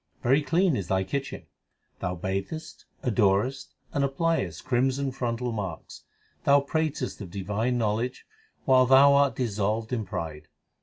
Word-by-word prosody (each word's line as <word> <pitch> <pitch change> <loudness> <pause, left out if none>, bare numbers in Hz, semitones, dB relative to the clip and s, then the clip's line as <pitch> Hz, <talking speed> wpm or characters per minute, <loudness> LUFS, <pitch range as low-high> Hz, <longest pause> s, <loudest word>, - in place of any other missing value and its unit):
Very 135 +5 +4
clean 170 +1 +2
is 95 -6 -3
thy 95 0 +1
kitchen. 135 +7 -4 0.5
Thou 90 0 -2
bathest, 95 - -5 0.2
adorest, 115 +2 +1 0.2
and 140 - +1
appliest 135 - -1
crimson 135 +2 +1
frontal 125 -1 -2
marks. 95 -7 -6 0.4
Thou 140 0 +5
pratest 145 -4 -2
of 95 - -7
divine 105 +6 -1
knowledge 115 +2 -1 0.4
while 130 -1 +5
thou 135 +2 +7
art 140 -1 +3
dissolved 110 0 -1
in 115 -3 -1
pride. 80 -6 -6
125 Hz, 135 wpm, -27 LUFS, 100-140 Hz, 0.5 s, thou